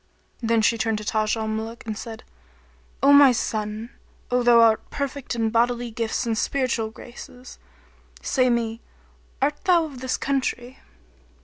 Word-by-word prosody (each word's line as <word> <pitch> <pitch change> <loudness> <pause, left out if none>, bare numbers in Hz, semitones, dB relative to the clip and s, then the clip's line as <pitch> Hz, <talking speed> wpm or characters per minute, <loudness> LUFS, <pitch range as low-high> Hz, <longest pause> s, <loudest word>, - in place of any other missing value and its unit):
Then 230 -1 +2
she 230 +2 +2
turned 225 -1 0
to 215 - -6
Taj 215 +1 0
al 220 0 -3
Muluk 220 +2 -5
and 220 -1 -4
said, 225 0 -8 0.8
"O 280 +1 +7
my 285 -2 +8
son! 215 -1 -3 0.4
O 250 0 +2
thou 240 -1 +5
who 230 - +8
art 225 -1 +3
perfect 280 -3 -4
in 225 -1 0
bodily 240 +1 +1
gifts 225 0 -2
and 230 -1 0
spiritual 240 -2 -1
graces; 245 +2 -12 0.6
say 255 -2 +1
me, 230 -1 -1 0.6
art 290 +1 -1
thou 345 -3 +4
of 280 -5 -9
this 260 -1 -1
country?" 260 -2 -2
235 Hz, 155 wpm, -24 LUFS, 220-255 Hz, 0.8 s, my